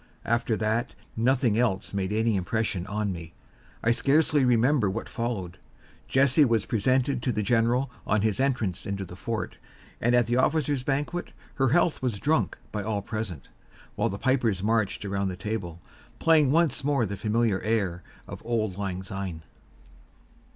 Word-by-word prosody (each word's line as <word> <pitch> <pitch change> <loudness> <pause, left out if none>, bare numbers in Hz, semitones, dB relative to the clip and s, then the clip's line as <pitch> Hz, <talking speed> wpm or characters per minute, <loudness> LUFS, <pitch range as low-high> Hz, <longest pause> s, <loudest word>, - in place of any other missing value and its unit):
After 115 -1 +1
that, 110 +3 -1 0.2
nothing 120 -1 +2
else 100 -7 0
made 100 -1 -1
any 110 +1 +1
impression 95 -1 -1
on 105 0 -1
me. 85 -2 -8 0.5
I 115 - +4
scarcely 145 +3 +3
remember 125 -1 +3
what 110 +5 -4
followed. 100 -7 -4 0.5
Jessie 140 +3 +4
was 115 -6 +2
presented 130 +3 +1
to 125 - 0
the 105 -2 -1
general 120 +3 +2 0.2
on 105 -1 +2
his 110 0 +1
entrance 125 -10 0
into 100 -1 -3
the 90 - -10
fort, 115 +3 -4 0.4
and 120 +1 +3
at 120 -1 +4
the 120 +2 0
officers' 145 0 +1
banquet 145 +6 -2 0.2
her 135 -1 +2
health 170 +3 +2
was 125 -5 -1
drunk 155 +10 +1
by 105 - -2
all 100 -1 -2
present, 110 - -5 0.4
while - - 0
the 100 - -4
pipers 120 -7 +1
marched 110 -2 0
around 100 0 -1
the 95 - -3
table, 90 -4 -4 0.4
playing 155 -4 +4
once 160 -3 +2
more 140 -4 +2
the 100 0 -4
familiar 110 -1 +1
air 100 -6 0 0.3
of - - -8
"Auld 110 -5 -1
Lang 95 -2 -3
Syne." 95 -4 -5
115 Hz, 160 wpm, -27 LUFS, 100-130 Hz, 0.5 s, I